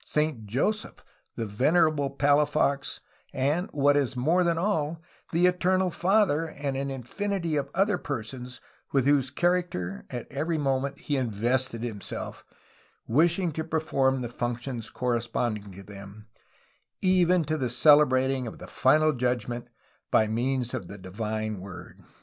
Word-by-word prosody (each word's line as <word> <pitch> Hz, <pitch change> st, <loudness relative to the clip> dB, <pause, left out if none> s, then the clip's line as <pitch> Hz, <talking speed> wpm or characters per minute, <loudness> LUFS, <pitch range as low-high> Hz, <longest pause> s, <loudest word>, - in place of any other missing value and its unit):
Saint 150 Hz, -8 st, -1 dB
Joseph, 205 Hz, -, -1 dB, 0.3 s
the 115 Hz, -, -3 dB
Venerable 145 Hz, +6 st, +2 dB
Palafox, 145 Hz, 0 st, +1 dB, 0.3 s
and, 145 Hz, +8 st, 0 dB
what 145 Hz, 0 st, +3 dB
is 140 Hz, -3 st, +1 dB
more 160 Hz, +9 st, +2 dB
than 170 Hz, -1 st, +1 dB
all, 165 Hz, -4 st, 0 dB, 0.3 s
the 170 Hz, +2 st, +3 dB
Eternal 180 Hz, +1 st, +2 dB
Father, 180 Hz, -4 st, +2 dB
and 140 Hz, -3 st, -4 dB
an 140 Hz, +1 st, -2 dB
infinity 170 Hz, -, -3 dB
of 140 Hz, -1 st, -1 dB
other 195 Hz, +1 st, +2 dB
persons, 125 Hz, -1 st, -6 dB, 0.3 s
with 135 Hz, -2 st, +2 dB
whose 140 Hz, -2 st, +3 dB
character 170 Hz, -, -1 dB
at 120 Hz, -3 st, -5 dB
every 155 Hz, +5 st, -1 dB
moment 135 Hz, -1 st, -1 dB
he 145 Hz, -, -1 dB
invested 120 Hz, +1 st, 0 dB
himself, 110 Hz, -4 st, -6 dB, 0.6 s
wishing 170 Hz, +7 st, +2 dB
to 160 Hz, +1 st, -3 dB
perform 135 Hz, -5 st, 0 dB
the 120 Hz, -, -4 dB
functions 120 Hz, -1 st, -4 dB
correspond 120 Hz, -2 st, -1 dB
ing 100 Hz, -1 st, -12 dB
to 100 Hz, +2 st, -11 dB
them, 100 Hz, +1 st, -11 dB, 0.8 s
even 180 Hz, -2 st, +4 dB
to 155 Hz, -5 st, -1 dB
celebrating 130 Hz, -1 st, +4 dB
the -, -, -11 dB
Final 155 Hz, +4 st, +3 dB
Judgment 120 Hz, -1 st, -2 dB, 0.4 s
by 110 Hz, -, +4 dB
means 125 Hz, +2 st, -1 dB
of 90 Hz, -, -4 dB
the 100 Hz, -, -9 dB
Divine 110 Hz, +2 st, -4 dB
Word." 95 Hz, 0 st, -10 dB
135 Hz, 135 wpm, -27 LUFS, 120-160 Hz, 0.8 s, even